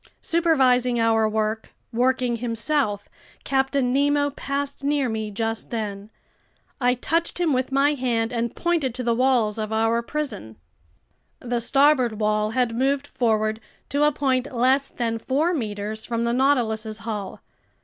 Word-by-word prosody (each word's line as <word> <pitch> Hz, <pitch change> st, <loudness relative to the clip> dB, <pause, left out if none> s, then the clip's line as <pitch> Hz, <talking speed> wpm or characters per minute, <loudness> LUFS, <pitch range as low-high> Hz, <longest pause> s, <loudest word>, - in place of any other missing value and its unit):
Supervising 260 Hz, -8 st, +2 dB
our 225 Hz, -1 st, +3 dB
work, 215 Hz, 0 st, -2 dB, 0.2 s
working 250 Hz, 0 st, +1 dB
himself, 230 Hz, -2 st, -1 dB, 0.4 s
Captain 270 Hz, -1 st, +1 dB
Nemo 285 Hz, +1 st, +2 dB
passed 280 Hz, 0 st, -4 dB
near 285 Hz, -1 st, +1 dB
me 220 Hz, -2 st, -3 dB
just 225 Hz, +2 st, -3 dB
then. 210 Hz, -3 st, -4 dB, 0.7 s
I 250 Hz, -1 st, +2 dB
touched 330 Hz, +8 st, -1 dB
him 335 Hz, -4 st, +2 dB
with 255 Hz, +1 st, -1 dB
my 280 Hz, +2 st, +3 dB
hand 240 Hz, -4 st, -1 dB
and 235 Hz, -1 st, -2 dB
pointed 325 Hz, -8 st, 0 dB
to 250 Hz, -, -3 dB
the 235 Hz, -1 st, +2 dB
walls 235 Hz, -4 st, +2 dB
of 215 Hz, 0 st, -3 dB
our 225 Hz, +1 st, +1 dB
prison. 235 Hz, -, -5 dB, 0.8 s
The 240 Hz, -1 st, -2 dB
starboard 265 Hz, -3 st, +3 dB
wall 215 Hz, 0 st, +1 dB
had 245 Hz, 0 st, 0 dB
moved 275 Hz, +3 st, +1 dB
forward 220 Hz, -4 st, 0 dB, 0.3 s
to 285 Hz, +2 st, +1 dB
a 300 Hz, -, +4 dB
point 265 Hz, -2 st, 0 dB
less 260 Hz, +3 st, +2 dB
than 230 Hz, -2 st, -2 dB
four 295 Hz, +9 st, 0 dB
meters 215 Hz, -5 st, -4 dB
from 230 Hz, -1 st, -2 dB
the 235 Hz, 0 st, 0 dB
Nautilus's 230 Hz, -5 st, +1 dB
hull. 210 Hz, -3 st, -5 dB
245 Hz, 145 wpm, -23 LUFS, 220-275 Hz, 0.8 s, a